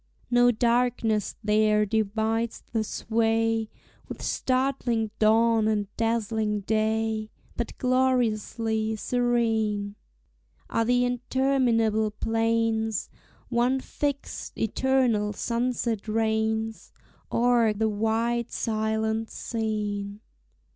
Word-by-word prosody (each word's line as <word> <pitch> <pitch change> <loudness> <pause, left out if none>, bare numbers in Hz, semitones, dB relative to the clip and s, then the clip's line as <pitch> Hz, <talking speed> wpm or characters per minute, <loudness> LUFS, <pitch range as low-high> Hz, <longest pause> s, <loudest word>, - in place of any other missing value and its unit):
No 245 0 +5
darkness 235 -2 +1
there 210 0 +3
divides 220 +2 -1
the 225 -1 +1
sway 225 0 0 0.4
With - - -8
startling 255 -4 0
dawn 225 0 +4
and 205 -2 -1
dazzling 220 -2 0
day; 220 +1 0 0.3
But 235 - -4
gloriously 230 -3 +1
serene 220 -4 0 0.8
Are 230 - +2
the 245 +1 +3
interminable 245 -3 +1
plains: 225 0 0 0.4
One 245 +2 +2
fixed, 285 +1 -4
eternal 225 -3 +1
sunset 235 -1 -2
reigns 220 0 -1 0.4
O'er 235 -2 +3
the 215 +1 0
wide 225 +2 0
silent 220 0 -1
scene. 210 -2 -3
225 Hz, 85 wpm, -26 LUFS, 215-235 Hz, 0.8 s, No